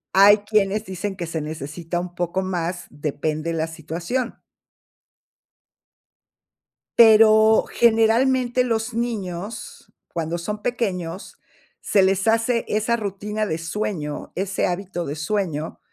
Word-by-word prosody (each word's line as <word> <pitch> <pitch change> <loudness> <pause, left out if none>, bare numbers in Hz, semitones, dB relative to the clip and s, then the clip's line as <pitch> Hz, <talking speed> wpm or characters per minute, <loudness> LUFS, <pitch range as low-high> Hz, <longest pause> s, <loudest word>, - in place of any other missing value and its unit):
Hay 200 +2 +8
quienes 210 0 +1
dicen 190 +1 -4
que 175 -2 -4
se 165 -1 -4
necesita 155 +3 -5
un 180 0 -6
poco 175 +2 -2
más, 175 -1 -3
depende 150 +2 -3
la 160 -1 -1
situación. 170 - -4 2.6
Pero 220 -1 +7
generalmente, 240 +2 +3
los 225 -1 -1
niños, 215 -3 -5 0.2
cuando 165 0 -3
son 210 +5 -5
pequeños, 190 -7 -3 0.4
se 195 - +3
les 195 +2 +1
hace 230 +1 +2
esa 215 +2 +1
rutina 210 0 -3
de 160 - -2
sueño, 165 -3 -4
ese 195 +1 -1
hábito 180 -1 -3
de 145 - -4
sueño 160 -2 -2
195 Hz, 115 wpm, -22 LUFS, 170-220 Hz, 2.6 s, Hay